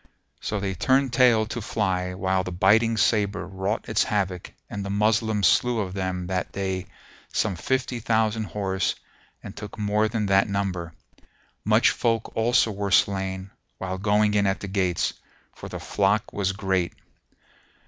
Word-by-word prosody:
So 105 - -3
they 95 -1 -2
turned 130 +5 +2
tail 120 -4 +5
to 115 +2 -5
fly 95 -4 -1
while 95 0 0
the 90 - -5
biting 110 +6 +3
sabre 100 -2 +1
wrought 95 +3 -3
its - - +2
havoc 95 -4 -2 0.2
and 100 -1 -5
the 100 - -5
Moslems 105 0 +2
slew 120 -2 +3
of 95 -3 -3
them 95 -2 -3
that 90 0 -2
day 95 -1 -3 0.4
some 100 -3 0
fifty 130 +5 -1
thousand 110 -1 +1
horse 95 -2 -1 0.5
and - - -9
took 105 +1 -8
more 105 0 +1
than 110 -1 -1
that 95 +1 +3
number: 90 -5 -2 0.7
much - - +4
folk 115 -1 -1
also 115 0 +3
were 100 0 -3
slain 95 -1 +1 0.3
while 95 0 -4
going 105 +1 +2
in 100 -1 +3
at 95 - -1
the 100 - -5
gates, 95 -3 0 0.4
for - - -9
the - - -6
flock 100 +1 0
was 95 -2 0
great. 95 -3 -1
100 Hz, 160 wpm, -25 LUFS, 95-110 Hz, 0.7 s, tail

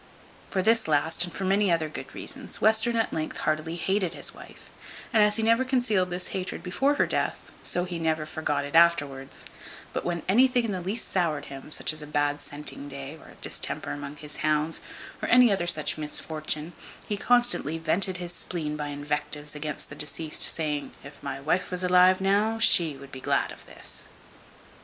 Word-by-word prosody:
For 190 -2 0
this 225 -1 +3
last, 160 +3 +2
and 185 +2 -4
many 195 0 +3
other 165 -2 +1
good 155 - -8
reasons, - - -4
Western 220 +2 +3
at 225 -1 0
length 155 -1 -3
heartily 155 +2 -1
hated 190 +1 0
his - - 0
wife; - - -13 0.4
and 220 - +5
as 210 0 +4
he 225 - 0
never 230 +3 +4
concealed 245 -8 +1
this 180 +1 -4
hatred 185 -1 -4
before 270 +11 +1
her - - +3
death, - - -2
so 175 - 0
he 175 -2 -4
never 160 -1 0
forgot 150 -2 -2
it 145 - -8
afterwards; 145 -5 +2 0.5
but - - -2
when 170 -2 -2
anything 250 +4 +4
in 225 - -2
the 185 -2 -3
least 200 +6 -2
soured 160 -6 0
him, 135 - -9
as 155 0 -1
a 150 - -8
bad 145 -1 0
scenting 145 -1 -8
day, 140 +1 -7
or - - -15
a - - -15
distemper - - -2
among 145 0 -6
his 150 0 -8
hounds, 155 +1 0 0.4
or - - -2
any 250 -2 +7
other 175 -3 -1
such 155 -2 0
misfortune, 155 +1 -1 0.3
he 210 - -1
constantly 240 - +2
vented 175 +3 +2
his 175 -1 -4
spleen 155 -4 -3
by 150 -1 -4
invectives 145 +1 -2
against 150 0 -5
the 140 - -9
deceased, 150 +2 -1
saying, 150 -3 +1
"If 140 +1 -12
my 135 - -4
wife 155 +6 0
was 180 0 -1
alive 180 +1 +5
now, 205 +3 +2
she 170 -9 +5
would 140 0 -12
be 130 - -8
glad - - +1
of - - -13
this." - - -5
165 Hz, 190 wpm, -27 LUFS, 150-195 Hz, 0.5 s, any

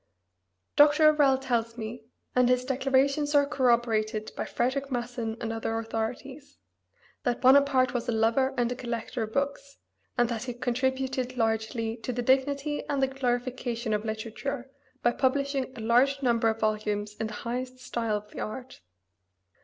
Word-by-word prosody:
Dr. 300 +1 +7
O'Rell 290 -3 +4
tells 235 -3 -1
me 220 0 -6 0.3
and 250 -1 +4
his 250 0 +2
declarations 275 +2 +1
are 285 0 +6
corroborated 235 -6 +1
by - - -3
Frederic 275 +3 -1
Masson 240 -2 -3
and 225 -1 -3
other 225 0 -2
authorities 250 +6 -5 0.6
that 245 -3 -1
Bonaparte 260 -1 +5
was 245 -1 -2
a - - +3
lover 230 +4 +2
and 240 0 +1
a - - -2
collector 235 -1 -4
of 220 -1 -3
books, 280 +1 -2 0.4
and 240 -1 +4
that 235 0 -3
he 245 -2 -5
contributed 255 +1 -1
largely 225 0 -1
to 250 - -4
the 245 0 -2
dignity 280 +3 +1
and 280 -2 +1
the - - +4
glorification 245 -3 -2
of 210 0 0
literature 235 +5 -4 0.3
by 240 - +4
publishing 275 +1 0
a 230 - -7
large 260 +5 +3
number 230 -2 +3
of 220 0 -3
volumes 210 -1 -1
in 220 - -2
the - - -8
highest 250 +2 -3
style 230 -4 -2
of 210 0 -11
the - - -8
art. 255 +4 -6
245 Hz, 160 wpm, -28 LUFS, 225-270 Hz, 0.6 s, Dr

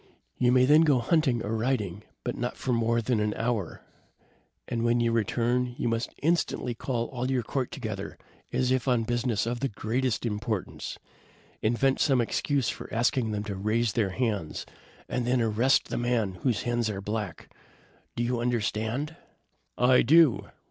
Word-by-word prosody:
You 125 -1 +4
may 130 0 +5
then 150 +4 +6
go 150 -5 +4
hunting 125 -2 +2
or 110 +2 -2
riding, 110 -5 -1 0.2
but 120 - -2
not 120 0 -3
for 130 - -1
more 115 0 +1
than 120 -1 +1
an 105 0 0
hour; 115 -6 -2 0.8
and 115 -2 -2
when 120 +1 +3
you 115 -1 +2
return, 120 +2 0
you - - -1
must 115 +1 -1
instantly 165 -6 +1
call 115 0 -2
all 125 0 -3
your 130 -2 +1
court 130 +2 -2
together, - - -5 0.3
as 125 0 +1
if 130 0 +1
on 125 -3 +3
business 120 -1 0
of 120 +1 -2
the 135 - 0
greatest 120 +3 -1
importance. 105 -2 -3 0.6
Invent 125 +4 +2
some 135 -4 +3
excuse 135 +2 0
for - - -5
asking 120 0 +1
them 105 -1 -2
to 105 -2 -4
raise 110 +3 0
their 110 -5 +1
hands, 105 -6 -2 0.4
and 125 -1 -2
then 125 0 +2
arrest 115 +4 +2
the - - -2
man 115 -6 0
whose 125 -5 0
hands 120 -2 0
are 100 -2 -3
black. 105 -2 -4 0.7
Do 120 - -1
you 120 0 0
understand?" 120 +5 -1 0.6
"I 125 +1 +5
do!" 130 - +5
120 Hz, 170 wpm, -28 LUFS, 110-125 Hz, 0.8 s, then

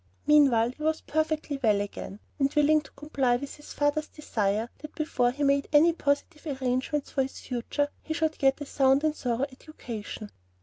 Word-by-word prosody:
Meanwhile, 270 -6 +5
he 285 - -16
was 315 +1 0
perfectly 310 -2 -1
well 210 -5 +3
again, 205 0 -6 0.2
and 275 0 +2
willing 300 +1 +4
to 280 - -16
comply 275 -4 0
with 275 +3 -5
his 295 - -12
father's 290 +1 0
desire 220 -7 -1
that 305 0 -10
before 255 -6 +1
he 280 +4 -3
made 280 0 +2
any 315 +3 +6
positive 290 -1 -2
arrangements 260 +3 -1
for 270 - +1
his 265 0 -4
future, 255 +4 -2
he 315 - -4
should 315 -1 -1
get 270 +1 +3
a - - -3
sound 270 0 +3
and 310 -1 +1
thorough 245 -2 -1
education. 235 -7 -8
280 Hz, 180 wpm, -28 LUFS, 250-300 Hz, 0.2 s, any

